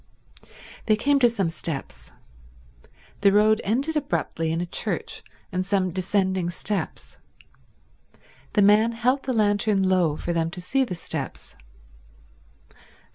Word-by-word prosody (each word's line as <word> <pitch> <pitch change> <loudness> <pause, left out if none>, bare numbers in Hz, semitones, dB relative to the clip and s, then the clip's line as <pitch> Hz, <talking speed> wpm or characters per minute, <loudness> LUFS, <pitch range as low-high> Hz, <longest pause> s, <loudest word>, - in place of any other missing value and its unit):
They 215 - +5
came 280 +6 +2
to 245 -2 +5
some 200 -7 -1
steps. 140 - -6 1.1
The 200 -1 +5
road 215 +2 +4
ended 270 +10 0
abruptly 165 - -1
in 165 - -1
a 175 - -1
church 170 - -2 0.3
and 185 0 -1
some 190 -1 0
descending 185 0 0
steps. 195 +3 -4 1.4
The 205 - +4
man 215 +3 +5
held 250 +4 +1
the 265 - -1
lantern 205 -2 +2
low 175 -5 +2
for 175 - -3
them 165 -1 0
to 180 +2 -8
see 265 +10 +1
the 195 -8 -4
steps. 170 - -6
195 Hz, 130 wpm, -24 LUFS, 175-220 Hz, 1.4 s, They